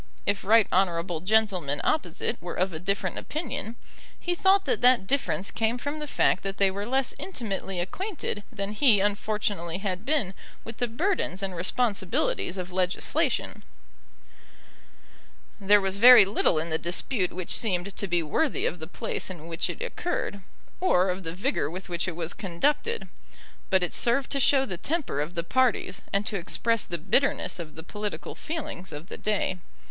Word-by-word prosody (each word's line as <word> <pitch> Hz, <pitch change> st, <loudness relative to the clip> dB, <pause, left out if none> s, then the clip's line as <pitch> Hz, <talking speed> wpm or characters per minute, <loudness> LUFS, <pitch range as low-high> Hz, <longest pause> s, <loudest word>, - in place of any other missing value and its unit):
If 200 Hz, -1 st, 0 dB
right 220 Hz, +2 st, +6 dB
honourable 175 Hz, -2 st, +1 dB
gentlemen 185 Hz, -7 st, +1 dB
opposite 230 Hz, -, -1 dB
were 175 Hz, -, -5 dB
of 185 Hz, 0 st, 0 dB
a 160 Hz, -, -5 dB
different 190 Hz, +1 st, -1 dB
opinion, 290 Hz, -6 st, -5 dB, 0.4 s
he 350 Hz, -, -1 dB
thought 385 Hz, +2 st, +3 dB
that -, -, 0 dB
that 250 Hz, -5 st, +5 dB
difference 205 Hz, -5 st, -1 dB
came 225 Hz, +1 st, 0 dB
from 285 Hz, +4 st, -4 dB
the 300 Hz, -, -5 dB
fact 190 Hz, -, +2 dB
that 195 Hz, 0 st, -4 dB
they 195 Hz, -1 st, +3 dB
were 200 Hz, +2 st, -4 dB
less 265 Hz, +1 st, +1 dB
intimately 195 Hz, -, -4 dB
acquainted 310 Hz, -, -3 dB
than 200 Hz, -3 st, -4 dB
he 215 Hz, -2 st, +4 dB
unfortunately 205 Hz, -4 st, -1 dB
had 190 Hz, -1 st, -3 dB
been 240 Hz, -8 st, 0 dB, 0.3 s
with 225 Hz, 0 st, -8 dB
the 245 Hz, -, 0 dB
burdens 240 Hz, -, -1 dB
and 190 Hz, -2 st, -3 dB
responsibilities 190 Hz, -1 st, 0 dB
of 180 Hz, 0 st, -5 dB
legislation. 180 Hz, 0 st, 0 dB, 2.0 s
There 205 Hz, +1 st, +5 dB
was 195 Hz, 0 st, -1 dB
very 245 Hz, -2 st, +10 dB
little 195 Hz, -4 st, +2 dB
in 160 Hz, +2 st, -2 dB
the 160 Hz, -, +1 dB
dispute 180 Hz, +3 st, -1 dB
which 185 Hz, -1 st, 0 dB
seemed 195 Hz, -3 st, +1 dB
to 200 Hz, -, -1 dB
be 175 Hz, -2 st, +1 dB
worthy 275 Hz, -, 0 dB
of 175 Hz, -, -1 dB
the 160 Hz, -, -6 dB
place 180 Hz, -, -4 dB
in 170 Hz, -4 st, -8 dB
which 165 Hz, -1 st, -2 dB
it -, -, -4 dB
occurred, 350 Hz, -, -3 dB, 0.4 s
or 185 Hz, -, +3 dB
of 185 Hz, +2 st, -4 dB
the 165 Hz, -1 st, -5 dB
vigour 250 Hz, -, 0 dB
with 185 Hz, +3 st, -8 dB
which 175 Hz, +2 st, -2 dB
it 170 Hz, -, -3 dB
was 170 Hz, 0 st, -3 dB
conducted; 290 Hz, -, -1 dB, 0.6 s
but 190 Hz, -2 st, +3 dB
it 175 Hz, -, -1 dB
served 250 Hz, +3 st, +2 dB
to 275 Hz, -, 0 dB
show 270 Hz, 0 st, +4 dB
the 185 Hz, -8 st, -5 dB
temper 290 Hz, -, -2 dB
of 150 Hz, +4 st, -4 dB
the 170 Hz, -, -1 dB
parties, 245 Hz, -2 st, +1 dB
and 200 Hz, +1 st, 0 dB
to 205 Hz, -, -1 dB
express 230 Hz, +6 st, 0 dB
the 170 Hz, -, -3 dB
bitterness 185 Hz, -, +1 dB
of 160 Hz, -2 st, -7 dB
the 160 Hz, -, -8 dB
political 210 Hz, +3 st, -5 dB
feelings 300 Hz, -, -5 dB
of 150 Hz, +4 st, -8 dB
the -, -, -7 dB
day. 205 Hz, -3 st, 0 dB
195 Hz, 175 wpm, -27 LUFS, 180-245 Hz, 2.0 s, very